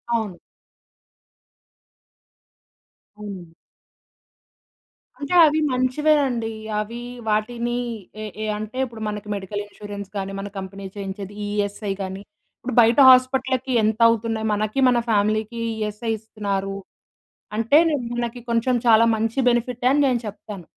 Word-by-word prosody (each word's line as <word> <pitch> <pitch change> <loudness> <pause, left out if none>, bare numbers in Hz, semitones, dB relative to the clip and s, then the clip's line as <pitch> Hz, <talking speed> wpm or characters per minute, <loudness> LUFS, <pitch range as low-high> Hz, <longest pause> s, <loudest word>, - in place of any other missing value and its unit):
అవును. 210 -6 -3 2.8
అవునండి. 190 -6 -9 1.6
అంటే 285 +3 -4
అవి 310 +1 +2
మంచివేనండి. 255 -3 +1 0.3
అవి 230 +3 -5 0.3
వాటిని 235 +3 -1 0.5
ఏ, - - -4 0.2
ఏ - - -1
అంటే 215 +3 -7
ఇప్పుడు 230 -3 -10
మనకి 210 0 -5
మెడికల్ 205 +1 -4
ఇన్స్యూరెన్స్ 205 -1 -8
కానీ 195 0 -3
మన 200 - -5
కంపెనీ 195 +1 -8
చేయించేది 195 0 -6
ఈ - - -3
ఈఎస్ఐ 205 0 -2
కాని. 190 +1 -5 0.4
ఇప్పుడు 255 -1 -4
బయట 230 +4 +4
హాస్పిటల్లకి 260 0 +3
ఎంత 215 +1 +1
అవుతున్నాయి 225 -1 -1
మనకి 215 +5 -1
మన 245 - +3
ఫ్యామిలీకి 215 +2 +1
ఈఎస్ఐ 215 +1 -3
ఇస్తున్నారు. 200 -3 -3 0.8
అంటే 230 +7 +4 0.4
మనకి 240 0 -3
కొంచెం 235 +2 +2
చాలా 230 0 +7
మంచి 225 +4 -2
బెనిఫిటే 245 +1 0
అని 290 +1 +3
నేను 245 -3 +1
చెప్తాను. 205 -2 -9
220 Hz, 115 wpm, -23 LUFS, 205-245 Hz, 2.8 s, చాలా